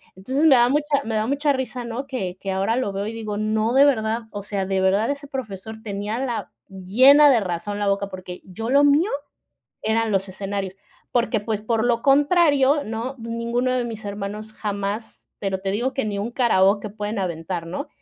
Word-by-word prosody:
entonces, 260 +11 -1
me 310 - +7
da 240 0 +5
mucha 290 0 +1
me 225 - -2
da 215 0 +1
mucha 285 +2 +1
risa, 255 -2 -4
¿no? 235 +4 -4
Que 190 -9 -4
que 195 - -4
ahora 195 +4 0
lo 255 -6 -1
veo, 200 +1 -3
y 220 - -4
digo: 215 -2 -4
"No, 215 +2 0
de 275 - +7
verdad, 225 -3 +1
o 205 -1 -6
sea, 200 -1 -2
de 190 0 0
verdad 195 +4 +2
ese 285 0 -4
profesor 220 -5 -6
tenía 205 +2 -3
la 250 -3 -3 0.2
llena 255 +11 +6
de 245 - +4
razón 200 +3 -3
la 205 - 0
boca", 200 0 0
porque 185 -1 -8
yo 225 +5 -6
lo 280 +2 +5
mío 290 +7 +4 0.7
eran 220 0 +1
los 195 0 0
escenarios, 195 0 -4 0.4
porque, 235 -2 +1
pues, 210 0 -3
por 225 0 0
lo 240 -1 +2
contrario, 285 -1 +4
¿no?, 230 +5 -4
ninguno 235 +2 -1
de 255 -1 +1
mis 225 -2 -7
hermanos 205 +1 -5
jamás, 205 +1 -5
pero 195 -2 -2
te 195 - -2
digo 240 +6 -1
que 270 - -1
ni 205 -2 -3
un 210 +4 -3
karaoke 205 -4 +2
pueden 210 +1 -4
aventar, 170 -1 -3
¿no? 185 - -5
220 Hz, 200 wpm, -23 LUFS, 200-255 Hz, 0.7 s, me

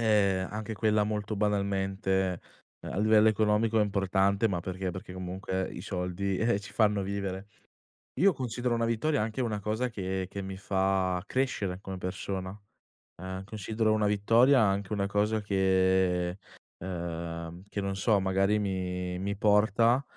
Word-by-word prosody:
ehm, 100 -4 +2
anche 110 +1 -5
quella 105 +1 +2
molto 105 0 -2
banalmente, 95 -2 0 0.4
ehm, - - -7
a - - -3
livello 110 0 +5
economico 110 +1 +3
è - - +5
importante, 100 +1 +1
ma 90 -5 -1
perché, 95 +1 -4
perché 95 0 -8
comunque 95 +1 -3
i - - -7
soldi, 95 +1 -2
eh-eh 110 -3 +1
ci 95 0 -11
fanno 105 -2 +2
vivere. 100 0 -4 0.7
Io 195 0 +6
considero 125 -2 -2
una 115 0 0
vittoria 115 +4 +1
anche 110 +3 -3
una 110 -4 -1
cosa 110 +5 -1
che 95 -4 -3
che 100 - -5
mi 95 0 -6
fa 95 -2 0
crescere 105 -9 -1
come 95 -2 -6
persona. 95 +1 -4 0.7
Ehm, 95 0 -5
considero 110 +2 -1
una 105 -1 +2
vittoria 115 +6 +4
anche 100 -1 +1
una 100 -2 0
cosa 105 +2 +1
che, 95 -2 +2 0.4
ehm, 85 -1 -5
che - - -4
non 100 0 -2
so, 100 +1 +2
magari 95 +2 +2
mi 90 -2 -2
mi 100 +2 -2
porta, 110 +5 +3
100 Hz, 150 wpm, -29 LUFS, 95-110 Hz, 0.7 s, Io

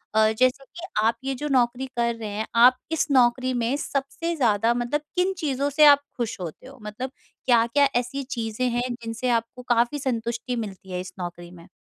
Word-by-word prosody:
अ, 220 0 +5
जैसा 255 +2 +3
कि 335 +5 -10 0.2
आप 230 0 +2
ये 270 0 -2
जो 295 +4 -4
नौकरी 250 0 +1
कर 235 -1 +1
रहे 220 -2 -6
हैं, 210 +2 -3
आप 250 +2 +7
इस 320 -2 +1
नौकरी 255 0 +3
में 240 +2 0
सबसे 290 +5 -3
ज़्यादा 230 -4 +2
मतलब 245 +5 -1
किन 365 +2 +2
चीज़ों 280 -3 -1
से 300 +2 +5
आप 285 -1 +7
खुश 230 -3 -3
होते 175 +8 -7
हो 270 0 -13
मतलब 215 +5 -5 0.3
क्या-क्या 240 +3 +4
ऐसी 245 +3 -1
चीज़ें 240 -2 -2
हैं 245 +1 -1
जिनसे 235 +1 -4
आपको 230 +1 -1
काफ़ी 240 +4 +2
संतुष्टि 235 -1 -2
मिलती 195 -4 -6
है 180 - -2
इस 185 0 -9
नौकरी 175 -1 -7
में? 170 -1 -14
245 Hz, 195 wpm, -24 LUFS, 230-270 Hz, 0.3 s, आप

